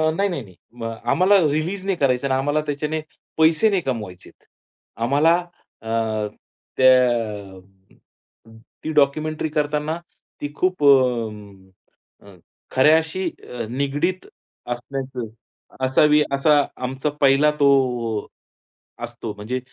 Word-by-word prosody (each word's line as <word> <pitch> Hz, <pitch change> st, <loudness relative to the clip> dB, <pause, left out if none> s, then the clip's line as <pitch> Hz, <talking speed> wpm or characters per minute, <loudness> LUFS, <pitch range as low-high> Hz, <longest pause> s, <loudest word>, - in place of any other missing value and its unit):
नाही, 200 Hz, +3 st, +1 dB
नाही, 170 Hz, -7 st, -3 dB
नाही, 95 Hz, -4 st, -17 dB, 0.2 s
म 120 Hz, -1 st, -9 dB, 0.3 s
आम्हाला 185 Hz, +4 st, +4 dB
रिलीज 170 Hz, +6 st, -2 dB
नाही 195 Hz, -1 st, 0 dB
करायचं 135 Hz, -1 st, +1 dB
ना, 130 Hz, -, +2 dB
आम्हाला 145 Hz, +3 st, 0 dB
त्याच्याने 150 Hz, +2 st, -2 dB, 0.4 s
पैसे 160 Hz, +6 st, +4 dB
नाही 195 Hz, -3 st, +1 dB
कमवायचेत. 105 Hz, -, -6 dB, 0.5 s
आम्हाला 145 Hz, +8 st, +3 dB, 0.5 s
अ, 110 Hz, -, -8 dB, 0.9 s
त्या 115 Hz, -7 st, +2 dB, 1.2 s
ती 160 Hz, -, -3 dB
डॉक्युमेंटरी 155 Hz, +2 st, +1 dB
करताना 150 Hz, +1 st, -1 dB, 0.4 s
ती 145 Hz, -, -4 dB
खूप 185 Hz, -3 st, 0 dB
अ, 105 Hz, -11 st, -1 dB
अ, 100 Hz, -, -14 dB, 0.4 s
खऱ्याशी 160 Hz, +6 st, +3 dB, 0.2 s
अ, 120 Hz, -2 st, -5 dB
निगडित 145 Hz, +8 st, -1 dB, 0.5 s
असण्याचं 130 Hz, 0 st, -5 dB, 0.6 s
असावी 150 Hz, +3 st, +4 dB
असा 145 Hz, +1 st, +4 dB, 0.2 s
आमचा 130 Hz, +3 st, -2 dB
पहिला 140 Hz, +2 st, +5 dB
तो, 125 Hz, -6 st, +2 dB, 0.8 s
असतो, 120 Hz, -2 st, -6 dB
म्हणजे 105 Hz, +5 st, -4 dB
140 Hz, 105 wpm, -22 LUFS, 120-155 Hz, 1.2 s, पहिला